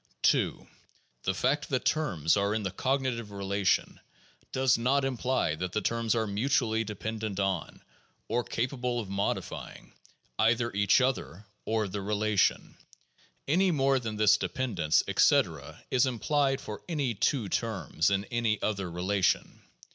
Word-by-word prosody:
2. - - +2 0.6
The 95 - +1
fact 140 +8 0
that 130 -2 -1
terms 90 - +1
are 100 +1 +1
in 110 - -2
the 95 - -2
cognitive 130 0 -1
relation 100 -1 0 0.5
does 130 -2 +3
not 135 +4 +1
imply 130 -8 0
that 90 +3 -4
the 105 - 0
terms 115 0 0
are 110 -1 +1
mutually 110 +1 +1
dependent 110 -1 -4
on, 95 -4 -2 0.4
or 120 +2 0
capable 125 0 -2
of 105 -5 -6
modifying, 100 +1 -4 0.5
either 115 +1 +2
each 100 +4 +4
other 115 -6 -2 0.2
or 110 -1 0
the 100 +1 -4
relation, 105 0 +1 0.7
any 185 +7 +3
more 135 -4 +2
than 110 -3 -4
this 105 0 +5
de - - -2
pendence, 100 - +1
etc., - - +1
is 130 0 +3
implied 135 +2 +1
for 105 -5 -7
any 145 -7 0
two 115 +2 0
terms 95 - -1
in 100 0 0
any 115 -3 +1
other 100 -4 -1
relation. 90 +2 0
110 Hz, 140 wpm, -29 LUFS, 100-130 Hz, 0.7 s, this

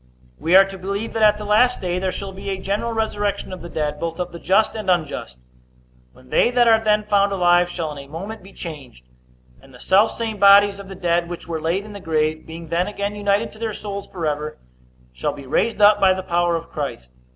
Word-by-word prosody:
We 170 +3 +2
are 195 +1 +9
to 195 -1 -9
believe 200 +4 -4
that 225 - -2
at 210 -1 +5
the 210 - -7
last 240 +4 +3
day 180 -1 -2
there 190 0 -1
shall 195 +1 -6
be 195 +1 -7
a 195 - -2
general 200 +5 -2
resurrection 205 -4 -2
of 185 - -8
the 170 - -8
dead, 150 -2 -3
both 165 +1 -4
of 180 0 -3
the 170 - -9
just 215 +5 +2
and 215 -3 -4
unjust: 155 - -1 0.7
when 130 - -20
they - - +4
that 245 -1 +3
are 225 -1 +5
then 210 -1 +2
found 200 -1 +2
alive 175 -2 +3
shall 165 -3 -4
in - - -8
a - - -16
moment 195 +9 -7
be 195 +2 -14
changed; 140 - -9 0.6
and 135 -2 -17
the - - -15
selfsame 220 - +2
bodies 200 0 +6
of 195 -1 -10
the 195 - -8
dead 170 -1 0
which 175 - -7
were 165 -2 -4
laid 175 +6 -1
in 210 - -10
the 200 - -8
grave, 155 -3 -1
being 165 0 -9
then 170 +2 0
again 205 0 -3
united 205 +1 0
to 215 - -16
their 225 -1 -3
souls 200 -1 -6
forever, 155 -3 -3 0.6
shall 60 - -2
be 140 -2 -10
raised 215 - 0
up 205 0 +6
by 190 -1 +4
the 190 - -5
power 175 -1 +1
of 165 - -5
Christ. 135 - -5
190 Hz, 230 wpm, -21 LUFS, 165-205 Hz, 0.7 s, are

